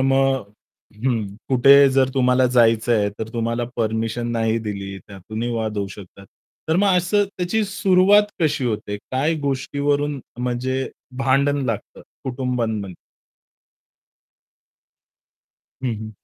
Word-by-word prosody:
मग 135 0 +2 0.6
हं, 120 -5 +1 0.2
कुठे 140 +2 +7
जर 130 -1 +3
तुम्हाला 125 -1 +3
जायचंय, 115 -3 +3
तर 110 - -4
तुम्हाला 115 0 -1
परमिशन 115 +1 -1
नाही 115 -1 +1
दिली 100 -3 -5
त्यातूनही 110 +5 -6
वाद 110 -2 -2
होऊ 100 - -1
शकतात. 100 -1 -12 0.4
तर 160 - +2
मग 195 -1 +3
असं 185 +4 +2
त्याची 185 +5 0
सुरुवात 195 +1 +4 0.2
कशी 150 -4 +1
होते? 105 -3 -2
काय 140 +5 +1
गोष्टीवरून 140 +1 -1 0.2
म्हणजे 125 +2 -2 0.3
भांडण 140 +1 +2
लागतं 115 -4 -4 0.2
कुटुंबांमध्ये? 120 -7 -2 2.9
हं, 120 -3 0
हं. 110 0 -7
125 Hz, 110 wpm, -21 LUFS, 110-140 Hz, 2.9 s, कुठे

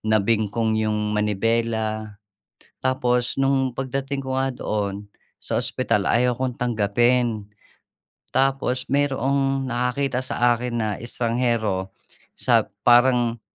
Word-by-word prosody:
nabingkong 110 +1 +1
yung 105 -1 -1
manibela. 110 0 -1 0.6
Tapos 125 -1 0
nung 135 -2 +1
pagdating 135 +1 -3
ko 130 0 -1
nga 135 - +1
doon 100 -1 -3 0.3
sa - - -2
ospital 120 -4 0
ayaw 125 +1 +3
'kong 125 0 -3
tanggapin. 120 0 +1 0.8
Tapos 135 -1 0
mayroong 135 -1 +1
nakakita 125 +1 -1
sa 120 -1 +2
akin 120 0 -3
na 110 -2 0
estranghero 115 -5 -1 0.5
sa - - +2 0.2
parang 120 -1 +4
120 Hz, 100 wpm, -23 LUFS, 110-130 Hz, 0.8 s, parang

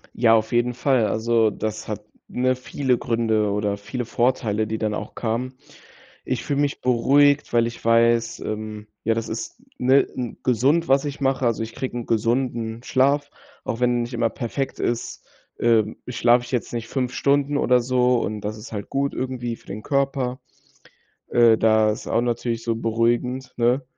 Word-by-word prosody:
Ja, 115 -1 +5
auf 110 0 0
jeden 120 0 +1
Fall. 125 -4 +2
Also, 115 0 +2
das 110 +1 -4
hat, 105 -1 -5 0.2
ne, 130 +1 +1
viele 130 0 -1
Gründe 110 -3 +1
oder 100 0 -1
viele 120 +5 -5
Vorteile, 115 -3 0
die 110 +1 -2
dann 110 -1 -1
auch 105 - -6
kamen. 125 +3 -2 0.7
Ich - - -2
fühle 145 0 0
mich 145 -1 -1
beruhigt, 140 +4 +3
weil 115 -1 +3
ich 120 - -9
weiß, 115 0 +3
ähm, 110 0 -5 0.2
ja, 115 0 +1
das 115 - -3
ist, 115 - -6 0.2
ne, 130 +2 +4
'n 125 -3 -4
gesund, 135 +8 +2
was 135 +2 +3
ich 145 0 -5
mache, 135 -1 +1
also, 115 -1 0
ich 110 0 -7
kriege 130 -1 -4
'n 120 - -5
gesunden 115 0 -1
Schlaf, 140 +3 +1 0.3
auch 115 - -3
wenn 120 -1 +2
nicht 120 +2 -7
immer 115 -1 +1
perfekt 130 +4 -4
ist, 120 -1 -3 0.3
ähm, 110 -2 +2
schlafe 120 0 +3
ich - - -11
jetzt 125 -2 -2
nicht 115 -1 -4
5 125 -2 -2
Stunden 140 +2 +1
oder 125 -2 +3
so 125 0 +2
und 105 -2 -3
das 105 +1 -4
ist 110 - -10
halt 105 -2 -6
gut 140 0 -1
irgendwie 125 -2 -3
für - - -23
den 105 +2 -6
Körper, 135 -2 -1 0.9
äh, 115 -2 +5
das 110 -1 +3
ist - - -13
auch 115 - +1
natürlich 120 -1 -2
so 115 -1 -1
beruhigend, 120 +3 0
ne? 125 +3 +2
120 Hz, 180 wpm, -23 LUFS, 115-130 Hz, 0.9 s, Ja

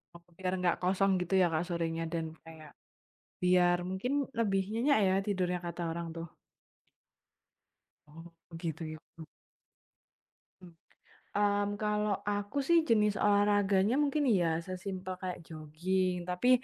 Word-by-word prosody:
Oh 170 - -12 0.2
biar 185 -1 -2
nggak 180 -1 +2
kosong 195 +2 +2
gitu 180 +1 -3
ya - - +6
Kak, 160 +2 +1
sorenya 165 -1 -2
dan 165 -1 -1 0.2
kayak 160 -2 -12 0.7
biar 180 -1 +4
mungkin 190 +8 -2 0.3
lebih 200 -4 +2
nyenyak 250 +5 +3
ya 185 - +3
tidurnya 180 -3 0
kata 170 0 -5
orang 170 0 -4
tuh. 165 0 -5 1.8
Oh 165 +3 -12 0.3
gitu 165 -1 -4
gitu. 155 +1 -13 1.4
Mmm. 180 -2 -13 0.7
Mmm, 205 0 +2
kalau 210 -1 0
aku 205 +4 -2
sih 340 - +5
jenis 210 -2 +3
olahraganya 205 +1 +3
mungkin 290 +1 +1
ya 175 -8 +2
sesimpel 185 0 -5
kayak 185 -1 -4
jogging. 175 +3 -2
Tapi 180 +8 +1
185 Hz, 125 wpm, -31 LUFS, 170-205 Hz, 1.8 s, ya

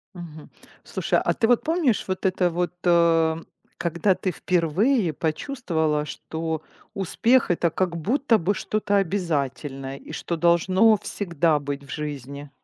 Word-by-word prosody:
Мгм. 160 -3 -10 0.3
Слушай, - - 0
а - - +2
ты 225 - +1
вот 245 0 +3
помнишь 315 - +1
вот 185 0 -3
это 185 -1 +2
вот, 175 +1 -1
э, 165 -2 +3 0.3
когда 170 +3 -1
ты 185 - -2
впервые 180 - +1
почувствовала, 160 - -1
что 160 +2 -4 0.3
успех- 225 +4 +2
это 170 0 +1
как 180 -2 -1
будто 230 - +2
бы 195 +3 0
что-то 205 0 -1
обязательное 145 -7 -2
и - - -7
что 170 - -4
должно 185 +6 +4
всегда 170 -6 0
быть 140 0 -5
в - - -19
жизни? 145 -1 -6
170 Hz, 140 wpm, -24 LUFS, 155-200 Hz, 0.3 s, должно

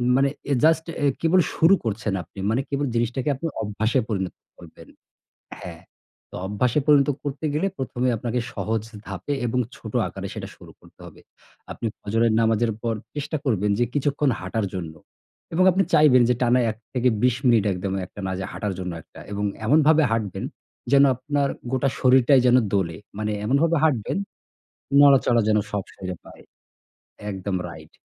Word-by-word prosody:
মানে 135 +1 +3 0.2
এ - - +4
just 160 0 +4 0.2
a - - +3 0.2
কেবল 170 +3 +4 0.2
শুরু 175 +5 +5
করছেন 105 -2 -2
আপনি। 95 - -14
মানে 120 +4 +1
কেবল 140 0 -1
জিনিসটাকে 120 +4 0
আপনি 165 +5 -4
অভ্যাসে 110 +4 0
পরিণত 95 -3 -2 0.2
করবেন। 85 -2 -14 0.7
হ্যাঁ। - - -9 0.5
তো - - -9
অভ্যাসে 120 +8 +1
পরিণত 145 -2 +5 0.2
করতে 145 +2 -5
গেলে 160 +6 +1
১ম 125 -2 -5
এ - - +4
আপনাকে 120 +1 -2
সহজ 110 -1 -1 0.2
ধাপে 145 - -4
এবং 125 +2 -1 0.2
ছোট - - -9 0.2
আকারে - - -7
সেটা - - -6
শুরু - - -14
করতে - - -21
হবে। - - -14 0.5
আপনি 115 - -5
ফজরের 115 +2 +1
নামাজের 115 0 +2
পর 115 -1 0 0.2
চেষ্টা 150 +2 -3
করবেন 105 -5 +1
যে 120 - +3
কিছুক্ষণ 145 0 +1
হাঁটার 100 +3 -2
জন্য 80 -4 -5 0.6
এবং 185 +2 +4
আপনি 195 +2 +2
চাইবেন 135 -5 +6
যে - - +4
টানা 125 +1 +4
১-২০ 120 +1 0
মিনিট 115 -4 +4
একদম 95 +1 -3
এক 90 - -14
টানা 95 -2 -4
যে - - -3
হাঁটার 105 -2 -3
জন্য 90 -1 -4
একটা। - - -15
এবং 105 +1 -2 0.2
এমনভাবে 155 +3 +5
হাঁটবেন 110 -4 -2 0.5
যেন 140 0 +7
আপনার 140 +2 -1 0.2
গোটা 130 +1 +1
শরীরটাই 130 +1 +5
যেন 125 +1 +6 0.2
দোলে। 85 -5 0 0.2
মানে 105 0 -1
এমনভাবে 155 +8 +2
হাঁটবেন 130 - +1 0.9
নড়াচড়া 130 -4 +5
যেন 105 - +4
সব 100 -2 -2
শরীরে 90 -1 -6
পায়। - - -14 0.9
একদম, 95 0 -3
রাইট। 80 -2 -12
120 Hz, 165 wpm, -23 LUFS, 105-140 Hz, 0.9 s, যেন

